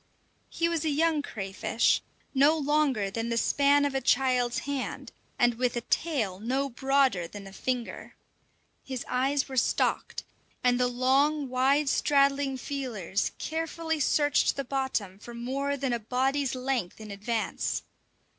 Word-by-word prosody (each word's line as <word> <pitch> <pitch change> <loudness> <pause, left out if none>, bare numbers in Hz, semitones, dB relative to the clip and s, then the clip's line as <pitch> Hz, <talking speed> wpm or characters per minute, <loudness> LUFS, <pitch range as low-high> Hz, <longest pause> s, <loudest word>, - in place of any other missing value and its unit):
He 335 - 0
was 335 -2 -1
a 315 - +1
young 310 +1 +2
crayfish, 200 -2 0 0.3
no 285 +4 +5
longer 285 -9 +1
than 225 +2 -3
the 235 - 0
span 285 +3 +3
of 285 - -1
a 270 - 0
child's 250 -2 +2
hand, 280 -2 -4 0.3
and 240 -2 +4
with 250 -1 +1
a 240 - -1
tail 230 - -1
no 265 +6 -1
broader 265 -8 +2
than 200 +2 -10
a 195 - -11
finger. 250 +1 -4 0.7
His 260 -2 -5
eyes 270 +3 +1
were 265 -1 -6
stalked, - - 0 0.4
and 245 0 +3
the 250 - +3
long, 270 +4 +2
wide 270 +3 +2
straddling 275 -1 +2
feeling 250 -10 -5 0.2
carefully 320 0 -3
searched 290 0 +2
the 275 - -2
bottom 245 -8 -2
for 240 +2 -10
more 275 +4 -2
than 270 -2 -1
a 235 - 0
body's 260 +4 0
length 255 -8 -2
in 215 -1 -8
advance. 215 +3 -2
265 Hz, 145 wpm, -28 LUFS, 240-285 Hz, 0.7 s, no